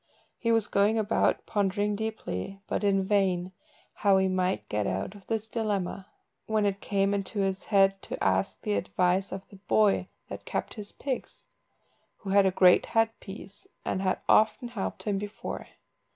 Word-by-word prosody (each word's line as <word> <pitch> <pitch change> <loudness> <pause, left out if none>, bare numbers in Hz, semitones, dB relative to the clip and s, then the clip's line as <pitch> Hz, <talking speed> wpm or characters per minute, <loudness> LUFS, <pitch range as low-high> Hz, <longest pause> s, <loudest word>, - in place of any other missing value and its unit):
He 230 - +1
was 225 -2 +3
going 205 +3 +2
about 215 0 +1
pondering 205 0 0
deeply, 200 - -4
but - - -2
in 195 -1 +3
vain, 190 -2 +1 0.4
how 200 -2 +3
he 190 0 +3
might 185 0 0
get 105 -1 -1
out 95 - -2
of 205 -2 -15
this 220 -1 -2
dilemma, 200 -4 -2 0.4
when 215 -1 +1
it 200 0 -1
came 195 0 +1
into 200 +1 -3
his 195 0 0
head 195 -2 +3
to - - -5
ask 95 +1 +1
the 105 - 0
advice 180 - +1
of 190 0 -6
the 200 - -13
boy 205 +1 +2 0.2
that - - -7
kept - - -3
his 210 -2 -7
pigs, 265 -3 -5 0.7
who 195 - -6
had 200 -1 +5
a - - +2
great 180 -1 +5
head 225 0 +2
piece, 200 0 -9 0.2
and 190 - -1
had 185 -1 0
often 220 +3 +4
helped 220 -5 -4
him 200 -2 0
before. 205 +1 -6
195 Hz, 170 wpm, -28 LUFS, 190-210 Hz, 0.7 s, had